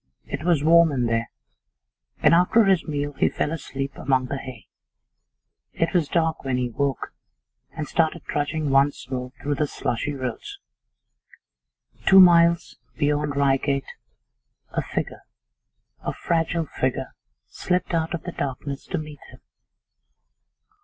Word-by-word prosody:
It 140 +1 -5
was 170 -4 +2
warm 165 0 +6
in 125 -3 0
there, 115 0 -1 0.9
and 150 - +6
after 180 +6 +5
his.meal 150 -6 0
he - - +4
fell 150 - -2
asleep 140 -3 -4
among 130 -1 +1
the 135 +2 -4
hay. 130 -4 -9 1.1
It 165 +2 -1
was 170 -5 +2
dark 160 -1 0
when 130 -2 -1
he 125 -1 -1
woke, 140 +2 -2 0.6
and 155 -2 -3
started 165 0 0
trudging 150 0 -2
once 135 -1 +2
more 125 -1 -3
through 145 0 -2
the 150 +1 0
slushy 145 +2 -2
roads. 130 -4 -5 1.5
Two 190 - +8
miles 170 -2 +5 0.2
beyond 145 -1 0
Reigate 140 0 +1 0.8
a - - -1
figure, - - -4 0.8
a - - -3
fragile 165 0 -1
figure, 130 -3 -3 0.3
slipped 180 0 -2
out 165 0 0
of 170 - -8
the 175 - -5
darkness 140 -1 -5
to 180 - -2
meet 150 -2 -7
him. - - -16
145 Hz, 130 wpm, -24 LUFS, 135-165 Hz, 1.5 s, Two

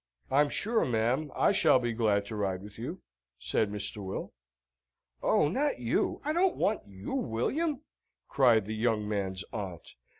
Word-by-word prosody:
"I'm 145 +2 +4
sure, 225 +7 +1
ma'am, 125 +5 0
I - - +4
shall 195 -8 +5
be 120 -2 -1
glad 105 -3 +1
to 110 - -6
ride 95 -2 -2
with 105 +1 -12
you," 160 +11 -5 0.4
said 105 +10 0
Mr. 105 0 -4
Will. 95 - -5 0.9
"Oh, 150 - +3
not 285 - 0
you! 120 -1 0
I 305 - +1
don't 360 +2 +2
want 215 - +1
you, 95 0 -7
William," 270 - -1 0.5
cried 120 -6 +4
the 110 - -4
young 110 -1 0
man's 95 -3 -2
aunt. 95 -6 -6
115 Hz, 160 wpm, -30 LUFS, 105-155 Hz, 0.9 s, shall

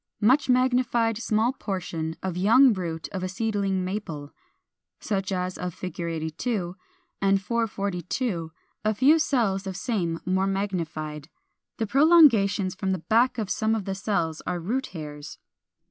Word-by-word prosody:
Much 255 +7 +3
magnified 250 -2 +2
small 230 +2 +1
portion 175 -8 -4
of 185 -2 -2
young 230 +7 +6
root 165 -4 -4
of 190 - -5
a 185 - -2
seedling 195 -2 -1
Maple 165 -7 -5 0.7
(such 195 -2 -2
as 185 -1 -2
of 180 -2 -4
Fig. 185 0 -7
82); 170 +4 -3 0.5
and 195 0 +3
442, 200 -4 -2 0.3
a 215 0 +1
few 285 +8 +5
cells 210 -10 +1
of 190 -1 -4
same 185 -7 -1
more 190 +1 +1
magnified. 165 -6 -3 0.5
The 225 - 0
prolongations 225 - +5
from 190 0 -2
the - - -1 0.2
back 245 +3 +4
of 215 -4 -2
some 220 0 +1
of 210 -4 -3
the 195 - -2
cells 190 -5 -1
are 175 - -1
root 235 +11 -2
hairs. 150 -3 -8
195 Hz, 145 wpm, -26 LUFS, 180-225 Hz, 0.7 s, young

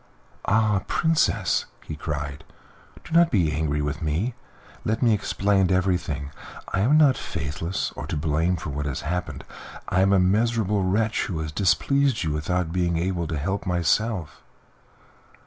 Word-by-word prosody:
"Ah! 105 -2 +2
Princess," 165 -1 +1 0.2
he 75 - -5
cried, 75 -1 -5 0.6
"do - - -13
not 170 0 +5
be 90 - +2
angry 75 0 -1
with 75 +1 -3
me. 80 +11 -1 0.5
Let 110 +4 -1
me 115 -2 +5
explain 100 -2 +1
everything. 90 -6 0 0.4
I 95 - +1
am 130 +10 +4
not 145 -4 +5
faithless 80 +6 -3
or - - -6
to - - -2
blame 80 +4 +1
for 75 -3 -5
what 75 +1 -3
has 70 - -3
happened. 90 +3 -3 0.5
I 95 - +2
am 95 +1 +4
a 100 - +5
miserable 105 +1 +2
wretch 105 +4 +1
who 90 - -3
has 80 -1 -4
displeased 130 - +2
you 80 - -1
without 80 +3 -1
being 90 -2 +1
able 85 -1 -1
to 80 - -3
help 95 +8 -2
himself." 90 -2 0
90 Hz, 155 wpm, -24 LUFS, 75-105 Hz, 0.6 s, not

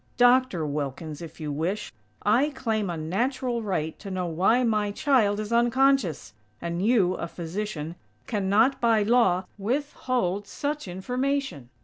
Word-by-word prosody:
Doctor 245 -8 +4
Wilkins, 145 +1 -4
if 165 0 -10
you 150 -2 -4
wish, 175 +7 -2 0.3
I 240 +8 +3
claim 220 -8 -2
a 170 - -3
natural 235 - -1
right 180 -7 -2
to 200 - -8
know 185 -1 -2
why 190 +9 +2
my 215 -3 +1
child 210 -3 +2
is 215 +2 -3
unconscious! 240 - +2 0.3
And 170 +2 -3
you, 205 -5 +3
a - - -4
physician, 170 -1 -5 0.3
cannot, 215 +5 +2
by 225 -3 +4
law, 205 -5 +3
withhold 235 -4 -1
such 295 -4 -3
information!!" 250 - -2
210 Hz, 135 wpm, -26 LUFS, 175-245 Hz, 0.3 s, Doctor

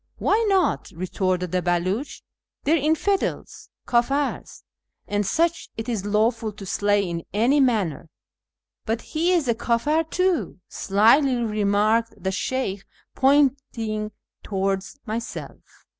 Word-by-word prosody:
" - - -46
Why 440 +3 +2
not? 385 -2 +1
" - - -20
retorted 180 0 -1
the 185 - +1
Beliich, 180 +9 -1 0.2
" - - -65
they 295 - +1
are - - +6
infidels, 320 +6 -1 0.2
kdfirs, 270 +4 0 0.4
and 205 0 0
such 335 +8 0
it 225 +1 -5
is 215 -5 -2
lawful 220 +1 +1
to 200 -1 -10
slay 205 +1 +1
in 170 -1 -4
any 240 +8 +3
manner." 205 - +1 0.4
" - - -65
But 225 +1 -1
he 335 +3 0
is 340 -7 +2
a 235 - +3
Mfir 290 +8 0
too," 365 - 0
slyly 235 +7 +3
remarked 215 0 +1
the 190 -1 -2
Sheykh, 200 -1 -2 0.3
pointing 260 -6 +1 0.3
towards 195 +3 -2
myself. 230 +1 -5
225 Hz, 135 wpm, -24 LUFS, 200-275 Hz, 0.4 s, are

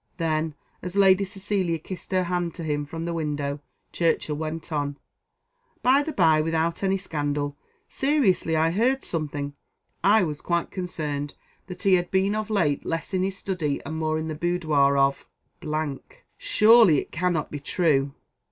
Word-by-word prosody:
Then, 160 -2 -1 0.3
as 180 +1 -5
Lady 195 0 +5
Cecilia 195 -3 -1
kissed 180 +5 -8
her 185 -1 +2
hand 175 -1 -2
to 170 - -6
him 145 -2 -1
from 165 +3 -6
the 170 - -2
window, 145 -3 -2 0.3
Churchill 165 -2 0
went 160 +2 -5
on: 145 -2 -2 0.9
"By 260 +3 +5
the 315 +2 -3
by, 160 - +4
without 165 +1 -1
any 195 0 +1
scandal, 145 -5 -2 0.3
seriously 265 - +1
I 160 +1 +3
heard 250 +8 +1
something 145 -3 -3 0.5
I 210 +1 +5
was 150 -3 -3
quite 170 -1 -1
concerned 150 -6 -4 0.3
that 180 -1 -8
he 195 - +4
had 175 0 -3
been 190 +2 +2
of 215 0 -3
late 165 -10 +1
less 165 +3 -4
in 185 - +1
his 190 0 -1
study 165 -9 -2
and 155 +3 -5
more 155 0 -1
in 160 0 -3
the 155 - -3
boudoir 155 -4 +2
of. 140 0 +1 1.1
Surely 225 - +6
it - - -3
cannot 175 -2 -1
be 145 - -4
true!" 140 -3 +1
165 Hz, 160 wpm, -25 LUFS, 150-190 Hz, 1.1 s, Surely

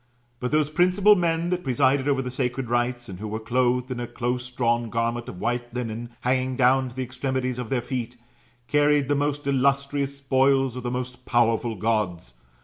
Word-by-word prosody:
But 125 - -3
those 150 -1 +2
principal 185 +5 +5
men 170 -1 0
that 180 0 -1
presided 130 +1 +2
over 135 -2 +1
the 125 - -4
sacred 125 -1 -2
rites, 120 0 0
and 90 -3 -8
who 110 - -5
were 110 +1 -3
clothed 125 +2 0
in 125 - -3
a 120 - -3
close 125 +1 -3
drawn 120 -2 0
garment 115 +2 -2
of 90 - -9
white 120 +2 -2
linen, 120 -1 -4
hanging 130 +1 0
down 130 +1 +3
to 120 - -14
the 130 - -2
extremities 130 0 -2
of 120 -3 -5
their 125 -3 0
feet, 125 -1 -4 0.5
carried 145 -1 +3
the - - +3
most 145 0 -1
illustrious 140 +1 +1
spoils' 135 -1 +2
of 125 - -5
the 120 - -3
most 125 0 -5
powerful 115 -1 +2
Gods. 95 - -1
125 Hz, 190 wpm, -25 LUFS, 120-140 Hz, 0.5 s, principal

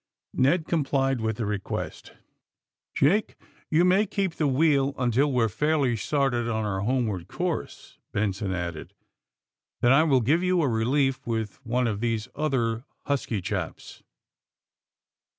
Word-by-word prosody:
Ned 155 +6 +2
complied 135 -5 0
with 110 -1 -1
the 115 - -2
request. 105 -1 -4
^^ - - -27 0.8
Jake, 195 +10 +2 0.3
you 165 +3 +4
may 190 +4 +4
keep 195 -3 -1
the 155 - 0
wheel 140 0 +2
until 125 +3 +2
we 125 -3 +2
are - - +3
fairly 145 +2 +1
started 120 +1 0
on 110 -1 -1
our 95 -2 -2
homeward 105 -5 -1
course," 180 - -4
Ben 105 -1 0
son 100 0 -4
added. 85 -3 -5 0.3
* - - -65
' - - -59
Then 120 - +4
I 135 +3 +6
will 135 -5 +3
give 150 +9 +2
you 180 -2 +2
a - - +2
relief 130 +4 +1
with 110 +1 -3
one 125 +1 0
of 105 -3 -1
these 115 -1 -1
other 125 -6 0 0.2
husky 125 -8 -1
chaps." - - -5
130 Hz, 155 wpm, -26 LUFS, 110-150 Hz, 0.8 s, I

